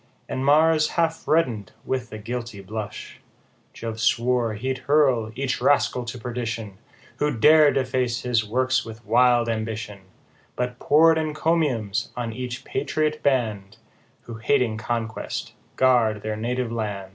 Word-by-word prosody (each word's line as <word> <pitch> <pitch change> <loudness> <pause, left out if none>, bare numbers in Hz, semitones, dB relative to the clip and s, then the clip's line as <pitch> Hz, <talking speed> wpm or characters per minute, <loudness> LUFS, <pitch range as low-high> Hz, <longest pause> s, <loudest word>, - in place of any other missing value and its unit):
And 130 - -3
Mars 155 +2 +4
half 165 -3 0
redden'd 125 - +1
with 130 -2 -3
a 110 - -6
guilty 115 -1 -6
blush; 105 +2 -7 0.5
Jove 115 -1 -6
swore 120 -2 +1
he'd 130 +4 -3
hurl 130 -7 +3
each 135 0 -2
rascal 125 -3 +2
to 120 +1 -6
perdition, 115 -4 -5 0.4
Who'd 145 -5 -1
dare 155 +2 +7
deface 130 -2 -1
his 120 -3 +1
works 130 +4 +1
with 115 0 -11
wild 120 +2 +4
ambition; 110 -2 -4 0.6
But 125 0 -3
poured 160 +2 +5
encomiums 155 - 0
on 115 -2 -3
each 125 +1 -6
patriot 155 +2 -1
band, 110 -8 -1 0.4
Who 115 -1 -9
hating 115 -1 +1
conquest 115 -1 -4 0.2
guard 120 -5 +3
their 110 0 -2
native 120 +2 -2
land. 105 -4 -4
120 Hz, 135 wpm, -24 LUFS, 110-135 Hz, 0.6 s, dare